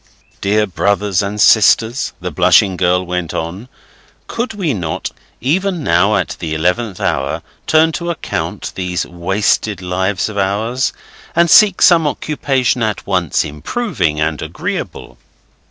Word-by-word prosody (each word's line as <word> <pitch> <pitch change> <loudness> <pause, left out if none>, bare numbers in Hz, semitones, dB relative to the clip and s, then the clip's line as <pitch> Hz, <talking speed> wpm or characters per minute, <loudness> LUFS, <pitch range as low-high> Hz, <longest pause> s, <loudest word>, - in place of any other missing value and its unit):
'"Dear 105 +2 +2
brothers 100 0 0
and 100 +1 -4
sisters," 110 +4 +4
the - - -5
blushing 95 -2 +4
girl 90 0 +1
went 90 -2 -3
on, 90 +9 -5 0.6
"could 230 -1 -4
we 175 -8 -1
not, 85 -7 -4 0.3
even 175 +5 0
now, 90 +2 +3
at 95 - -2
the 80 -2 -3
eleventh 90 +5 -1
hour, 70 +1 -1 0.2
turn 160 +1 +4
to 170 +2 -4
account 100 - -4
these 90 -1 -2
wasted 95 +3 -1
lives 95 +1 -1
of 105 -2 -4
ours, 110 +7 0 0.4
and 170 -1 +3
seek 205 -4 +6
some 165 -3 +5
occupation 135 -5 -1
at 110 -2 -2
once 90 -5 0
improving 80 - -2
and 75 -1 -1
agreeable?" - - -5
100 Hz, 135 wpm, -16 LUFS, 90-130 Hz, 0.6 s, seek